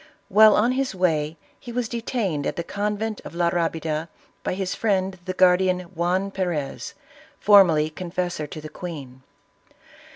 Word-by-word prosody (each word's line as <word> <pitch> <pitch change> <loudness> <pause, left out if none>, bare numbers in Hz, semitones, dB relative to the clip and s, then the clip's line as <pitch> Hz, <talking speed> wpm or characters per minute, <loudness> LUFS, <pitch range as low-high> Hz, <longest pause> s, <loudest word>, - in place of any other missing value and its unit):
While 215 +2 +7
on 235 +4 +3
his 260 -4 -1
way 160 -4 0 0.2
he 240 - -9
was 240 -1 -1
detaine^ 225 - -2
at - - -2
the 170 - -3
convent 210 +3 -3
of - - -10
La 170 -1 +2
Rabida, 165 -2 -1 0.3
by - - -2
his 190 -1 -2
friend 190 -3 0
the 185 - -3
guardian, 185 0 +4
Juan 180 +2 -1
Perez, 175 -8 -3 0.4
formerly 170 -7 +5
confessor 175 -2 -3
to 155 - -8
the 155 - -8
queen. 145 -6 -8
180 Hz, 150 wpm, -24 LUFS, 165-200 Hz, 0.4 s, While